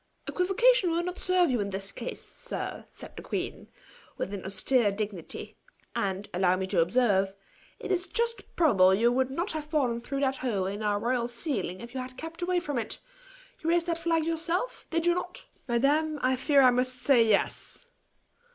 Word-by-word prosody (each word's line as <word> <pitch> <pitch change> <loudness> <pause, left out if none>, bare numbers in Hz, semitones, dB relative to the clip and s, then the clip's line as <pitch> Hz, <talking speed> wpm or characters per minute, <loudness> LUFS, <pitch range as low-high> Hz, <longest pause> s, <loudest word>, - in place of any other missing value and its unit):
"Equivocation 390 +3 +3
will 335 +1 0
not 360 +1 -4
serve 365 -4 +3
you 245 - +1
in 200 -1 -1
this 195 0 -3
case, 240 - -6
sir," - - -6
said - - -11
the - - -7
queen, - - -4 0.5
with 195 - -3
an 195 - -5
austere 205 +4 +2
dignity. 200 -4 -5 0.4
"And, 195 0 -1
allow 180 0 +3
me 190 0 -2
to 190 -2 0
observe, 195 0 +2 0.4
it - - -5
is 370 0 0
just 465 0 -2
probable 190 - +5
you 235 +4 +3
would 260 +1 +1
not 340 +8 -2
have 310 -2 -4
fallen 260 -7 0
through 275 +3 -3
that 270 -1 +1
hole 210 -7 -1
in 200 +3 -3
our 205 -1 +1
royal 240 +1 0
ceiling 235 - -3
if 235 +1 -9
you 265 - -3
had 255 0 -7
kept 325 +2 -7
away 355 0 +1
from 290 -7 -2
it. 225 - -3 0.7
You 325 - 0
raised 340 0 +3
that 335 -1 -1
flag 330 -2 +1
yourself 330 +7 -2
did 330 0 0
you 345 - +5
not?" 360 - -5 0.2
"Madam, 290 +6 +2
I 260 +1 +3
fear 275 +2 +4
I 255 - +7
must 255 +1 +1
say 250 -1 +4
yes!" 220 - 0
255 Hz, 190 wpm, -28 LUFS, 205-330 Hz, 0.7 s, I